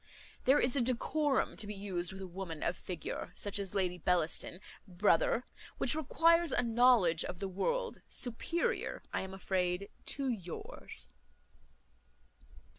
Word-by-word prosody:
There 270 +3 +6
is 245 +1 +2
a 275 - +3
decorum 265 +4 +1
to 215 - -4
be 210 - -5
used 185 -3 -2
with 190 0 -7
a - - -5
woman 175 -3 -6
of - - 0
figure, 175 -4 -5
such 205 0 +1
as 200 0 -4
Lady 180 -2 0
Bellaston, 175 +1 0 0.3
brother, 210 - +2 0.3
which - - +3
requires 330 +2 +3
a 245 - +2
knowledge 230 -8 +5
of 180 - -5
the 195 - -3
world, 470 - -1
superior, 340 - -1
I - - 0
am 190 0 -6
afraid, 185 0 -1 0.2
to 275 -1 -2
yours." 190 -9 -5
200 Hz, 140 wpm, -34 LUFS, 180-260 Hz, 0.3 s, There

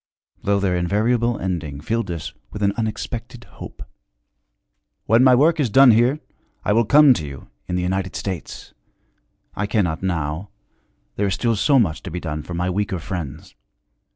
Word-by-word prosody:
Though 100 0 +1
their 95 -2 0
invariable 110 +6 +1
ending 80 -6 -4
filled 110 +6 -2
us 85 -3 -5 0.2
with 105 - -5
an 100 0 +2
unexpected 115 +2 -4
hope: - - -11 1.2
'When 115 +3 +4
my 130 -1 +7
work 155 +5 +3
is 135 -5 +1
done 130 +4 +7
here, 120 +6 +3 0.5
I 105 - +2
will 115 +2 +3
come 145 +3 +7
to 80 -9 -4
you, 70 -1 -10 0.2
in 90 - -2
the 90 - -1
United 95 +1 -2
States. 95 -5 -6 0.8
I 105 - -2
cannot, 90 -7 0
now 85 0 -2 0.7
there 100 - +1
is 95 - 0
still 115 -2 0
so 140 +7 +3
much 90 -11 +1
to 95 - -7
be 90 +1 -4
done 75 -3 -4
for 85 +3 -7
my 90 +1 -1
weaker 95 +1 -1
friends. 80 -3 -6
100 Hz, 170 wpm, -21 LUFS, 85-115 Hz, 1.2 s, my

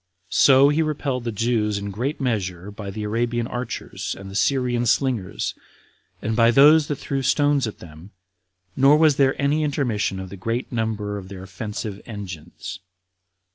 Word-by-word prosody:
So 135 +1 +6
he 150 +2 +2
repelled 140 -5 -2
the 115 - -1
Jews 110 -1 0
in 100 0 -4
great 125 +9 -3
measure 100 -7 -2
by 100 -1 -7
the 105 +2 -5
Arabian 115 +2 -1
archers, 110 -6 -5
and 95 0 -9
the - - -9
Syrian 120 +2 +1
slingers, 120 -8 0 0.7
and 110 +1 -1
by 115 0 +5
those 145 +5 +6
that 145 - -1
threw 135 0 -3
stones 145 -1 +2
at 110 - -7
them, 80 +2 -13 0.7
nor 135 +3 +6
was 155 -3 +4
there 135 -1 +2
any 145 +2 +2
intermission 120 -10 -1
of 95 -1 -7
the 100 - -8
great 115 +6 -3
number 110 -3 -2
of 95 -1 -11
their 95 -1 -8
offensive 105 +2 -6
engines. 95 -8 -8
115 Hz, 165 wpm, -23 LUFS, 100-135 Hz, 0.7 s, So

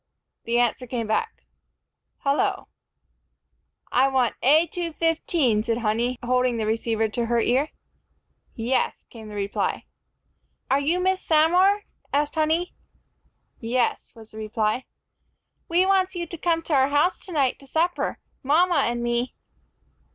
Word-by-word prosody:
the 235 +1 +1
answer 245 +1 +1
came 235 -2 -3
back, 440 - -2 0.8
"Hullo!" 280 +1 0 1.2
"I 260 +2 +4
wants 260 -3 +1
A 305 +6 +5
215," 330 -7 0
said 230 -1 0
Honey, 240 +2 0
holding 250 -1 +1
the 220 - -1
receiver 225 0 0
to 235 +2 -2
her 235 0 +2
ear. 260 +6 +1 0.9
"Yes," 245 +3 -1
came 220 -2 -10
the 210 - -8
reply. 200 0 -2 0.9
"Are 270 - +4
you 320 +6 +1
Miss 375 +1 +1
Samor?" 355 +6 +4 0.3
asked 290 +1 0
Honey. 320 +3 0 0.9
"Yes," 240 +1 -1
was 225 -1 -14
the 215 - -12
reply. 215 +2 -1 0.8
"We 350 +2 +3
wants 380 -1 +2
you 345 -1 -3
to 340 - -7
come 330 -1 +1
to 320 - -3
our 270 -1 +4
house 295 +6 +1
tonight 290 -9 0
to 275 - -14
supper, 335 +5 0 0.2
mama 320 +3 +3
and 240 0 -2
me." 240 +1 -1
265 Hz, 135 wpm, -24 LUFS, 235-330 Hz, 1.2 s, A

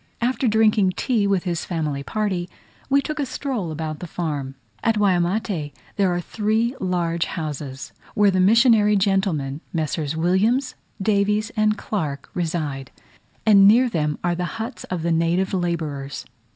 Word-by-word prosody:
After 250 +2 0
drinking 215 -3 +3
tea 225 -6 +1
with 195 -3 +1
his 175 -3 -2
family 155 -5 -2
party, 185 +1 -2 0.4
we 280 0 +3
took 305 +1 -4
a 285 - +1
stroll 245 - -3
about 155 0 -4
the 180 - -6
farm. 145 -6 -4 0.3
At 225 -1 +2
Waimate 180 -4 0 0.2
there 195 -3 +2
are 175 - 0
three 220 +6 0
large 170 -2 0
houses, 145 -5 -5 0.2
where 205 -1 +4
the 185 - +1
missionary 215 +1 +5
gentlemen, 190 -8 0
Messrs. 155 -2 -2
Williams, 205 +11 +2 0.3
Davies, 210 +2 +1
and 215 0 +2
Clarke, 145 -9 -4
reside; 155 -6 -3 0.6
and 200 -3 +7
near 240 +5 +6
them 150 -7 -1
are 175 0 +1
the 175 +1 -2
huts 225 +4 -5
of 180 -3 -4
the 170 - +1
native 170 +4 +1
labourers. 160 -6 -3
185 Hz, 150 wpm, -22 LUFS, 160-215 Hz, 0.6 s, and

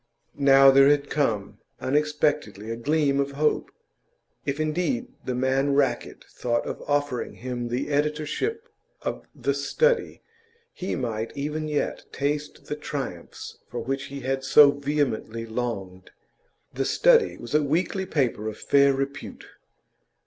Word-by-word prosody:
Now 135 -1 +7
there 135 0 +7
had 145 -1 +2
come 115 -9 -1 0.2
unexpectedly 145 -7 0
a - - -2
gleam 140 +3 +1
of 140 0 -1
hope. 150 +2 +1 0.8
If 140 +1 -1
indeed, 180 - -1 0.2
the 125 - -2
man 135 +2 +1
Rackett 135 -4 0
thought 120 -1 -2
of - - -5
offering 145 -3 -1
him 125 -1 -4
the 125 +4 -2
editorship 150 - -1 0.4
of - - -4
The 140 - 0
Study 465 - +1 0.5
he 185 - -3
might 115 -2 -3
even 150 +2 -2
yet 150 -1 -2
taste 145 +1 -3
the 150 - -3
triumphs 135 - -6
for 120 +2 -4
which 135 +4 -3
he 140 0 -7
had 135 +1 -2
so 140 +1 +7
vehemently 140 -6 -2
longed. 100 -6 -4 0.6
The 135 +1 -1
Study 475 - +4
was 120 - -9
a 150 - +4
weekly 180 +6 0
paper 125 - 0
of 110 - -5
fair 140 -1 +4
repute. 135 +1 -5
140 Hz, 135 wpm, -25 LUFS, 125-150 Hz, 0.8 s, Now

